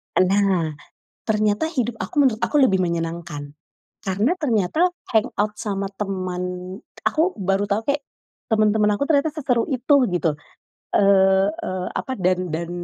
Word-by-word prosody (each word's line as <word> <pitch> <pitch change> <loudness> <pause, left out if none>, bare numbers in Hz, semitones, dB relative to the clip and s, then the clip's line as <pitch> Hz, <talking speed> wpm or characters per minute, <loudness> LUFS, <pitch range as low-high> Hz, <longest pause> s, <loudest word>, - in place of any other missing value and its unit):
Nah, 185 -3 +2 0.6
ternyata 215 +5 +1
hidup 245 -8 -2
aku - - -6
menurut 230 -5 +2
aku - - -2
lebih 195 -7 +4
menyenangkan. 165 -4 -3 0.5
Karena 200 - +1
ternyata, 290 - +1 0.2
hangout 215 -2 +1
sama 200 -2 -2
teman 185 -3 -3 0.6
aku 330 +5 +1
baru 195 +1 +1
tau 205 +3 0
kek, 285 +2 -1 0.5
teman-teman 215 -1 +3
aku 280 - -1
ternyata 305 0 +2
seseru 250 -7 0
itu, 265 +3 +3 0.2
gitu. 165 -4 0 0.6
Eee 195 0 +4
eee, 185 -3 -4
apa, 260 - -3
dan 185 -1 0
dan 170 +1 -3
205 Hz, 130 wpm, -22 LUFS, 185-235 Hz, 0.6 s, lebih